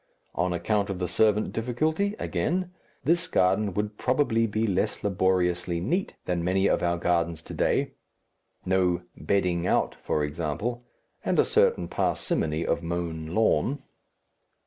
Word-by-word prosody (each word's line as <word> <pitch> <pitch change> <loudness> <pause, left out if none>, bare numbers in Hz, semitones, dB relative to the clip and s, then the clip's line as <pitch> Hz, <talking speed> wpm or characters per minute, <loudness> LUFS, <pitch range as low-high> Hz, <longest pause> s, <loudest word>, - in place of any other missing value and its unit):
On 90 0 0
account 100 +4 0
of 100 - -3
the 90 -1 -2
servant 105 +3 +2
difficulty, 155 - 0
again, 180 +2 -1 0.3
this 170 +5 +2
garden 95 +3 +2
would 105 0 -2
probably 125 -4 +2
be 110 +1 0
less 95 -4 -1
laboriously 90 -3 +1
neat 175 - -1
than 90 -2 -1
many 95 +2 +2
of - - +2
our 85 0 +1
gardens 85 -2 0
to - - -9
day - - +1 0.7
no 90 -2 +2
"bedding 90 -3 0
out," - - +2
for 75 - -2
example, 85 +11 -3 0.4
and - - 0
a - - +5
certain 85 - +2
parsimony 80 -1 -1
of - - 0
mown 85 -2 -3
lawn.... 130 +5 +2
95 Hz, 140 wpm, -27 LUFS, 85-115 Hz, 0.7 s, a